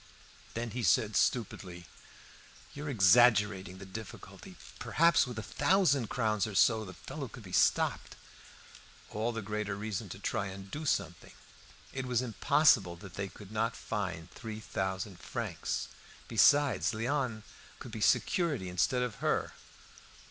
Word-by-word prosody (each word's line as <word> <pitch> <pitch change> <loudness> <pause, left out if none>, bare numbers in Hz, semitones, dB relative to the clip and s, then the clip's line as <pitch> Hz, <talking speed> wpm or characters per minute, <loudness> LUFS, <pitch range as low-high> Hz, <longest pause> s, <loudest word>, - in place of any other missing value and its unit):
Then 115 0 -3
he 125 - -3
said 110 -3 +2
stupidly, 90 -7 -1 0.9
"You 145 +1 -7
are - - -3
exaggerating 105 -4 +4
the 95 - -9
difficulty. 100 +3 -10 0.2
Perhaps, 165 -4 +3
with 120 -3 -7
a 110 - -4
thousand 170 - +2
crowns 110 -3 0
or 105 - -7
so 110 +2 +4
the 95 -3 -9
fellow - - -7
could - - -12
be - - -11
stopped." - - +2 1.0
All 110 +3 -1
the 115 -2 -5
greater 105 0 -3
reason 105 0 -4
to 95 - -7
try 100 0 -2
and 95 0 -9
do 155 +1 -4
something; 85 - -2 0.6
it 130 -1 -4
was 125 0 +1
impossible 120 - +3
that 95 +1 -12
they 100 0 -3
could 100 +1 -13
not 115 +2 -1
find 95 -6 -4
three 110 -3 -7
thousand 95 -2 -4
francs. - - -3 0.4
Besides, 145 +4 +4
Léon, 120 -1 -1 0.3
could - - -10
be - - -6
security 145 - +1
instead 125 +8 +1
of 125 -4 -4
her. - - 0
110 Hz, 145 wpm, -31 LUFS, 95-125 Hz, 1.0 s, exaggerating